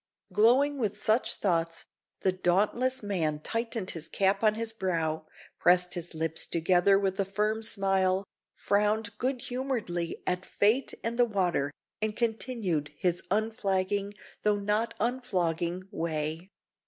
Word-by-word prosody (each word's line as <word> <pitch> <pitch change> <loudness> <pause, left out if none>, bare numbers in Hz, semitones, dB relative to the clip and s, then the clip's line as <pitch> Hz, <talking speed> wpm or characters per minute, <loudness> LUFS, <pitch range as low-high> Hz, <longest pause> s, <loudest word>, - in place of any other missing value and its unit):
Glowing 260 +8 +4
with 210 -3 -1
such 220 +4 +2
thoughts, 165 -3 0 0.4
the 190 - +3
dauntless 210 +8 +1
man 165 -7 -1
tightened 230 +2 -3
his 165 -1 -4
cap 195 +3 +1
on 215 -1 +4
his 225 0 -3
brow, 165 -6 -1 0.3
pressed 180 0 +4
his 175 -1 -5
lips 160 0 -2
together 180 +3 +4
with 195 -1 -1
a - - +4
firm 210 +3 -1
smile, 195 -3 +2 0.3
frowned 210 +1 +1
good 255 0 -1
humouredly 235 -11 -3
at 180 0 -1
fate 215 +8 +2
and 235 +2 -2
the 245 - +7
water, 180 -10 0 0.3
and 215 0 -1
continued 220 - -1
his 175 -1 0
unflagging, 200 -1 0 0.3
though 210 -1 +2
not 210 +3 0
unflogging, 185 -8 -1
way. 160 0 -3
195 Hz, 130 wpm, -29 LUFS, 175-220 Hz, 0.4 s, the